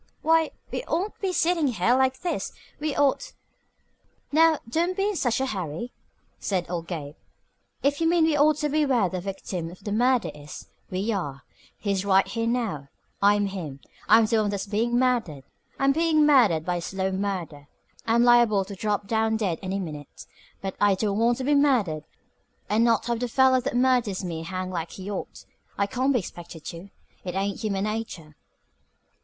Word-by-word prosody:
"Why, 320 Hz, 0 st, +3 dB, 0.2 s
we -, -, -3 dB
oughtn't 375 Hz, +6 st, -1 dB
to -, -, -38 dB
be 385 Hz, -2 st, 0 dB
sitting 340 Hz, -3 st, +2 dB
here 235 Hz, 0 st, +2 dB
like 260 Hz, 0 st, +1 dB
this. 350 Hz, -, -2 dB, 0.3 s
We 300 Hz, -1 st, -2 dB
ought 290 Hz, -, +1 dB, 0.5 s
" -, -, -42 dB
"Now, 320 Hz, +1 st, +5 dB
don't 340 Hz, +9 st, 0 dB
be 395 Hz, +1 st, +1 dB
in 415 Hz, -, -2 dB
such 245 Hz, -8 st, 0 dB
a 265 Hz, -, +1 dB
hurry," 190 Hz, -, -4 dB, 0.5 s
said 185 Hz, -3 st, -1 dB
old 170 Hz, -2 st, -3 dB
Gabe. 150 Hz, -5 st, -5 dB, 0.7 s
"If 285 Hz, +3 st, +1 dB
you 325 Hz, -, +3 dB
mean 340 Hz, -1 st, +3 dB
we 320 Hz, -1 st, +3 dB
ought 295 Hz, +1 st, +4 dB
to 300 Hz, -, 0 dB
be 305 Hz, +1 st, +2 dB
where 245 Hz, -9 st, +2 dB
the 185 Hz, 0 st, -4 dB
victim 190 Hz, -3 st, -5 dB
of 185 Hz, +3 st, -14 dB
the 205 Hz, -, -4 dB
murder 245 Hz, +2 st, +2 dB
is, 150 Hz, 0 st, -10 dB, 0.2 s
we 195 Hz, +5 st, -1 dB
are. 140 Hz, -8 st, -4 dB, 0.3 s
He's 200 Hz, -2 st, -1 dB
right 195 Hz, -1 st, +4 dB
here 230 Hz, -1 st, -2 dB
now. 220 Hz, -, -2 dB, 0.3 s
I'm 205 Hz, 0 st, +4 dB
him. 170 Hz, -9 st, -5 dB, 0.3 s
I'm 225 Hz, 0 st, +7 dB
the 220 Hz, 0 st, +2 dB
one 210 Hz, -, 0 dB
that's 200 Hz, -1 st, -3 dB
being 225 Hz, +4 st, 0 dB
murdered. 240 Hz, -, 0 dB, 0.3 s
I'm 275 Hz, 0 st, +3 dB
being 315 Hz, 0 st, +3 dB
murdered 225 Hz, -, +4 dB
by 175 Hz, 0 st, -1 dB
slow 190 Hz, +2 st, -2 dB
murder. 185 Hz, -7 st, -4 dB, 0.4 s
I'm 230 Hz, +1 st, +4 dB
liable 240 Hz, -5 st, +5 dB
to 200 Hz, -, -8 dB
drop 205 Hz, 0 st, -1 dB
down 220 Hz, +1 st, +1 dB
dead 190 Hz, -7 st, -1 dB
any 190 Hz, 0 st, -3 dB
minute. 150 Hz, -6 st, -8 dB, 0.4 s
But 195 Hz, -1 st, -4 dB
I 205 Hz, -1 st, +5 dB
don't 205 Hz, +1 st, -1 dB
want 235 Hz, +1 st, +3 dB
to 265 Hz, -, -4 dB
be 290 Hz, +3 st, +2 dB
murdered 235 Hz, -, +2 dB, 0.7 s
and 220 Hz, +2 st, +3 dB
not 230 Hz, -1 st, +2 dB
have 235 Hz, -1 st, -1 dB
the 245 Hz, -, -1 dB
feller 260 Hz, +1 st, +4 dB
that 240 Hz, -, -3 dB
murders 245 Hz, -6 st, +2 dB
me 165 Hz, -2 st, -4 dB
hang 185 Hz, +2 st, -4 dB
like 170 Hz, -2 st, -4 dB
he 195 Hz, +2 st, -7 dB
ought. 195 Hz, -, -6 dB, 0.3 s
I 200 Hz, -, +2 dB
can't 255 Hz, +6 st, 0 dB
be 260 Hz, -, +3 dB
expected 170 Hz, -5 st, -8 dB
to. 170 Hz, +4 st, -10 dB, 0.3 s
It 180 Hz, -1 st, -5 dB
ain't 195 Hz, 0 st, -1 dB
human 200 Hz, -3 st, -1 dB
nature." 210 Hz, -8 st, -5 dB
215 Hz, 190 wpm, -25 LUFS, 185-260 Hz, 0.7 s, I'm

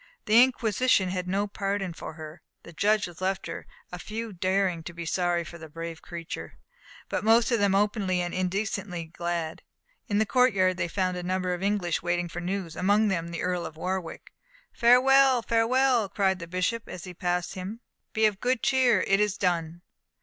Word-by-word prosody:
The 220 Hz, +2 st, +6 dB
Inquisition 245 Hz, -5 st, +2 dB
had 180 Hz, 0 st, -3 dB
no 195 Hz, +3 st, 0 dB
pardon 195 Hz, -2 st, -3 dB
for 165 Hz, -, -8 dB
her. 155 Hz, +1 st, -10 dB, 0.2 s
The 170 Hz, -, -12 dB
judges 200 Hz, -2 st, 0 dB
left 190 Hz, +1 st, -1 dB
her, 165 Hz, -, -7 dB, 0.2 s
a 180 Hz, -, -6 dB
few 220 Hz, +6 st, -5 dB
daring 185 Hz, -1 st, 0 dB
to 175 Hz, -, -7 dB
be 170 Hz, 0 st, -6 dB
sorry 175 Hz, 0 st, 0 dB
for 170 Hz, +1 st, -10 dB
the 160 Hz, 0 st, -10 dB
brave 165 Hz, +1 st, -7 dB
creature, 170 Hz, -2 st, -7 dB, 0.5 s
but -, -, -2 dB
most 225 Hz, +3 st, +4 dB
of 235 Hz, -, +2 dB
them 200 Hz, -1 st, +3 dB
openly 200 Hz, -2 st, +1 dB
and 175 Hz, 0 st, -2 dB
indecently 185 Hz, -1 st, -2 dB
glad. 170 Hz, 0 st, -4 dB, 0.5 s
In 205 Hz, -3 st, 0 dB
the 220 Hz, -, +3 dB
courtyard 200 Hz, -7 st, +3 dB
they 170 Hz, -, -1 dB
found 185 Hz, 0 st, -1 dB
a -, -, -3 dB
number 185 Hz, 0 st, -1 dB
of 175 Hz, -, -5 dB
English 195 Hz, -4 st, 0 dB
waiting 175 Hz, 0 st, -1 dB
for 175 Hz, -, -6 dB
news, 180 Hz, -2 st, -3 dB
among 205 Hz, +3 st, +3 dB
them 170 Hz, -3 st, -1 dB
the 170 Hz, 0 st, -5 dB
Earl 180 Hz, -1 st, -1 dB
of 155 Hz, -, -8 dB
Warwick. 185 Hz, 0 st, -4 dB, 0.4 s
"Farewell, 255 Hz, +1 st, +5 dB
farewell!" 235 Hz, -1 st, +2 dB
cried 190 Hz, -2 st, +1 dB
the 170 Hz, -, -7 dB
bishop, 185 Hz, +6 st, -2 dB
as 180 Hz, -, -7 dB
he 180 Hz, -, -8 dB
passed 180 Hz, 0 st, -2 dB
him; 195 Hz, +5 st, -6 dB, 0.3 s
"be 220 Hz, 0 st, +2 dB
of 210 Hz, -2 st, 0 dB
good 250 Hz, -1 st, 0 dB
cheer 250 Hz, -7 st, +3 dB
it 195 Hz, 0 st, +3 dB
is 210 Hz, -1 st, +1 dB
done!" 170 Hz, -2 st, -1 dB
185 Hz, 185 wpm, -27 LUFS, 175-215 Hz, 0.5 s, The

